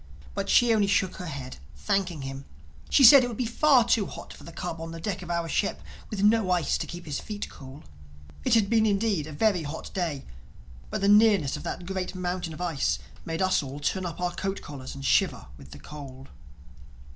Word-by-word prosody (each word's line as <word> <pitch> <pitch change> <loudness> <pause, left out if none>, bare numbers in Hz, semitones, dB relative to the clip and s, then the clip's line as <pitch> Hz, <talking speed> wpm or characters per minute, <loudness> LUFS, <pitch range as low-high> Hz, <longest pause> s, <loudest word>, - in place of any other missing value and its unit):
But 200 0 -3
she 240 -1 +5
only 210 -2 +3
shook 195 -2 +1
her 180 - -6
head, 135 -4 -7 0.2
thanking 185 -7 -1
him; 135 0 -6 0.4
she 275 - +5
said 270 +2 +10
it - - 0
would 235 -3 -6
be 250 - -1
far 255 +2 +4
too 220 -4 +2
hot - - -9
for - - -14
the 170 - -10
cub 165 -1 -5
on 165 0 -6
the 165 - -7
deck 195 +2 -3
of 175 - -9
our 170 -1 -1
ship, 195 +6 -1 0.3
with 200 -2 -3
no 215 -2 +4
ice 175 -5 +1
to - - -3
keep 175 0 -8
his 150 -3 -3
feet 210 -1 -6
cool. 135 +2 -12 0.6
It - - +3
had 215 -3 +3
been 220 0 +3
indeed 200 -6 0
a - - -8
very 185 +4 +1
hot 155 +1 -6
day; 165 -7 -2 0.6
but 215 -1 -3
the 200 - +2
nearness 205 -8 +5
of - - -6
that 175 - -5
great 185 0 -4
mountain 180 -1 -3
of 155 - -9
ice 165 -6 0 0.3
made 165 +2 -1
us 185 0 +2
all 140 0 -7
turn 180 +5 -1
up 170 - -7
our 180 0 -1
coat 195 +2 -4
collars 135 -3 -8
and 135 0 -7
shiver - - +2
with 70 - -14
the - - -11
cold. 135 - -10
180 Hz, 220 wpm, -27 LUFS, 150-205 Hz, 0.6 s, said